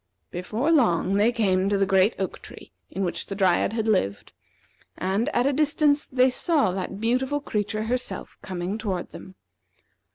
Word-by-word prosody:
Before 220 - -1
long 195 - +3
they 210 +4 +3
came 195 -5 +1
to 200 - +1
the 195 - +2
great 195 +3 +3
oak 190 - -4
tree - - -12 0.2
in 195 - -3
which 170 -2 -3
the 195 - -5
Dryad 190 +1 +2
had 225 -1 -1
lived, 100 - 0 0.6
and, 195 +8 0
at 245 -4 +1
a 280 - +2
distance, 295 0 +2
they 255 0 +3
saw 290 - +2
that 190 +1 -5
beautiful 255 +5 0
creature 215 -5 -2
herself 235 -4 -4
coming 185 +3 -4
toward 190 -5 -3
them. 190 - -11
210 Hz, 165 wpm, -25 LUFS, 190-250 Hz, 0.6 s, long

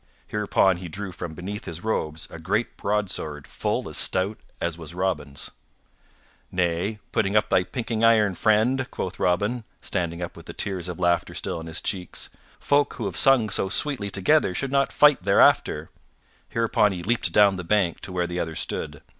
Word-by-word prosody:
Hereupon 100 -3 +2
he 90 0 -7
drew 100 +3 -5
from 85 -2 -7
beneath 100 +4 -6
his 85 +2 -6
robes 80 -8 -2
a 80 - -8
great 105 +8 -1
broadsword 90 -8 -2
full - - -2
as - - 0
stout 95 +3 +2 0.2
as 85 -1 -2
was 80 0 -8
Robin's. 75 -7 -2 1.0
"Nay, 90 +4 0
put 100 - +1
up 105 - +2
thy 90 - +4
pinking 115 +2 -3
iron, 110 -3 +5
friend," 115 +7 +2
quoth 95 0 -5
Robin, 105 +7 +1 0.2
standing 85 -3 -2
up 85 - -5
with - - -13
the - - -7
tears 95 -3 -3
of 90 -2 -5
laughter 85 -1 +1
still - - -3
on 80 - -8
his 80 +2 -3
cheeks. 90 -3 -2 0.3
"Folk 145 0 +2
who 115 - -4
have 95 - -3
sung 130 -5 +5
so 95 - 0
sweetly 125 -4 0
together 100 +1 +2
should 135 +7 -2
not 140 -1 +2
fight 150 -9 +5
thereafter." 90 -5 +3 0.6
Hereupon 110 -3 +2
he 90 -2 -6
leaped 115 +5 0
down 100 -2 +5
the 90 - -5
bank 90 -2 +1
to - - -8
where 90 -1 0
the 90 0 -4
other 80 -2 -3
stood. - - -3
95 Hz, 180 wpm, -25 LUFS, 85-110 Hz, 1.0 s, iron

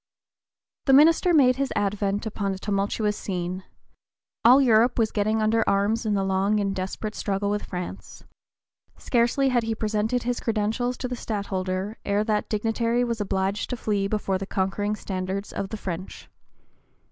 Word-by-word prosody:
The 270 - +4
minister 325 +5 +6
made 260 -6 +5
his 275 -1 -1
advent 200 +1 -1
upon 200 -3 -2
a - - -7
tumultuous 205 +2 -1
scene. 185 -1 -4 0.8
All 250 +4 +8
Europe 240 -2 +4
was 225 -2 +2
getting 215 +1 +1
under 225 +1 +3
arms 215 +3 +1
in 210 - +1
the 195 - +1
long 195 +2 +1
and 195 -1 -1
desperate 190 +3 -4
struggle 200 0 -1
with 210 - -2
France. 180 -1 -7 0.7
Scarcely 245 +3 +2
had 245 -2 +2
he 225 0 -2
presented 220 +2 -1
his 245 0 -1
credentials 225 +3 -1
to 255 - -3
the 250 - -4
Stadtholder 195 -2 -3
ere 205 +1 +1
that 215 -1 -1
dignitary 230 +3 0
was 235 -3 -2
obliged 195 0 -1
to 250 - -3
flee 205 -3 0
before 200 -2 -1
the 195 - -5
conquering 200 +2 -1
standards 190 0 -4
of 195 - -3
the 220 - -5
French. 185 -2 -7
210 Hz, 160 wpm, -25 LUFS, 195-230 Hz, 0.8 s, All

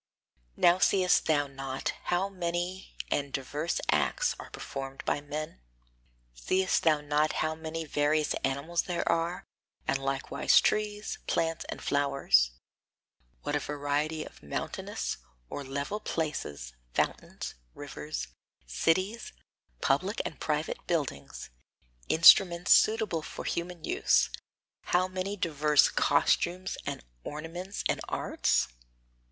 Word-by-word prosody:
Now 175 +1 +5
seest 185 -2 +4
thou 145 -2 +3
not 135 -1 -4 0.2
how 180 +2 +1
many 180 0 -3 0.2
and 140 -1 0
diverse 145 +5 -2
acts - - +2
are - - -9
performed 135 0 -6
by - - 0
men? 145 - -6 0.7
Seest 185 - +1
thou 155 -2 +3
not 150 +1 +1
how 155 - 0
many 160 0 -5
various 150 +1 +1
animals 140 +6 0
there 175 -2 -3
are, 170 +2 0 0.4
and 135 - +1
likewise 135 0 +3
trees, 210 0 -1
plants 165 0 0
and - - -6
flowers; 140 - +3 0.9
what 145 - -1
a - - +2
variety 150 +2 -1
of - - -14
mountainous 70 - -4 0.3
or 145 - -4
level 140 +9 -3
places, 105 - -3 0.2
fountains, - - -2 0.2
rivers, - - -5 0.4
cities, 185 - 0 0.5
public 185 +10 +1
and 160 - -5
private 150 0 -1
buildings, 135 - -3 0.6
instruments 170 +1 +7
suitable 215 -7 +4
for - - -7
human 170 -1 -3
use; - - +3 0.5
how 180 +1 +2
many 185 +2 -3
diverse 150 -4 +4
costumes 175 +5 +2
and - - -4 0.2
ornaments 170 +6 -5
and - - 0
arts? - - +1
155 Hz, 115 wpm, -30 LUFS, 140-180 Hz, 0.9 s, instruments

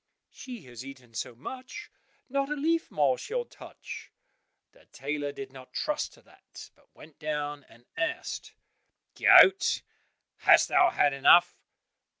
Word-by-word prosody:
"She 245 -8 -10
has 125 -1 -10
eaten 130 -3 -13
so 115 +2 -5
much, 255 - -9 0.4
not 275 +1 -1
a 300 - -1
leaf 325 +3 0
more 140 -4 +1
she'll 480 +2 -3
touch." - - -11 0.6
The - - -24
tailor 145 +1 -4
did 135 -1 -9
not 130 -1 -13
trust 300 0 -2
to - - -21
that, - - -15
but - - -30
went 155 - -16
down 145 -2 -4
and 120 +1 -20
asked, 360 +12 -4 0.6
"Goat, 385 +1 +6 0.5
hast - - +5
thou 360 -1 +5
had 145 -1 +2
enough?" 140 +5 +5
150 Hz, 140 wpm, -28 LUFS, -, 0.6 s, Goat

